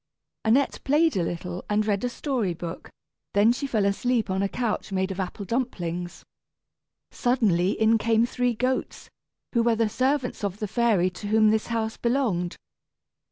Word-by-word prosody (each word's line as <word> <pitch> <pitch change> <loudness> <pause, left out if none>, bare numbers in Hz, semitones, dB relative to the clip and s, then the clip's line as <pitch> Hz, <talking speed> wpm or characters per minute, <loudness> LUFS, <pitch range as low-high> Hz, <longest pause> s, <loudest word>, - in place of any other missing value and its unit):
Annette 250 +6 +2
played 305 +3 +3
a 185 - +1
little 175 +1 -4
and 210 0 +2
read 205 0 0
a 245 - 0
story 240 - -2
book, 170 0 -7 0.5
then 205 +3 +5
she 275 +3 -2
fell 220 -6 +1
asleep 220 +1 0
on 190 +1 0
a 200 - 0
couch 225 -3 -2
made 190 0 0
of 190 - -6
apple 190 +2 -4
dumplings. 180 -7 -3 0.9
Suddenly 205 -8 +2
in 220 +1 +4
came 225 +1 +3
three 245 0 0
goats, 255 +3 -2 0.4
who 235 - +3
were 230 0 +3
the 225 -1 +1
servants 255 +1 -1
of 200 -1 -2
the 210 - -3
fairy 205 -5 +2
to 195 +3 -7
whom 215 0 +4
this 220 0 0
house 225 -1 -2
belonged. 235 -9 0
220 Hz, 165 wpm, -25 LUFS, 190-245 Hz, 0.9 s, then